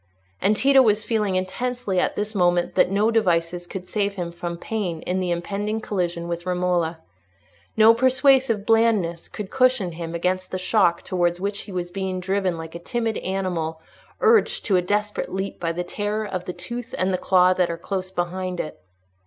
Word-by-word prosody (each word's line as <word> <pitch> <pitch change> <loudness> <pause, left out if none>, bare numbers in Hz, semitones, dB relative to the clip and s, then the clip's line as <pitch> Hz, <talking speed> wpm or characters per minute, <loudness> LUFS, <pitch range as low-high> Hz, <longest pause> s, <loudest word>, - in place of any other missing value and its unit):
And 205 +3 +3
Tito 270 +2 +6
was 215 -3 +3
feeling 210 -5 0
intensely 200 +2 -1
at - - 0
this 210 +1 -3
moment 175 -3 +2
that - - +4
no 205 +4 +2
devices 175 -5 +1
could 185 0 -7
save 200 -1 -1
him 175 -3 -4
from 170 0 -5
pain 180 -5 -3
in 185 +1 -1
the 180 -1 -1
impending 200 +5 -2
collision 175 -5 -2
with 170 +1 -4
Romola; 180 -2 0 0.8
no 220 +1 +8
persuasive 260 -3 +3
blandness 220 -7 +2
could 205 -3 -7
cushion 255 -8 +2
him 165 0 -6
against 185 +2 -1
the 185 - -3
shock 185 -2 +2
towards 175 -1 0
which 200 +2 -2
he - - -9
was 175 -1 -4
being 190 -1 -3
driven 190 -1 -1
like 160 0 -8
a 170 - -6
timid 230 +4 -2
animal 180 -4 -2 0.4
urged 450 0 +3
to 200 - +2
a 180 - +4
desperate 210 +3 -1
leap 190 +1 -4
by 165 -1 -1
the 175 +2 -3
terror 205 +4 -2
of 185 -3 -4
the 180 - -4
tooth 240 +7 -6
and 185 +1 +1
the 185 - 0
claw 185 -1 +4
that 180 -1 +1
are 170 - -3
close 185 +1 -4
behind 185 0 -3
it. 155 - -5
185 Hz, 185 wpm, -23 LUFS, 175-210 Hz, 0.8 s, no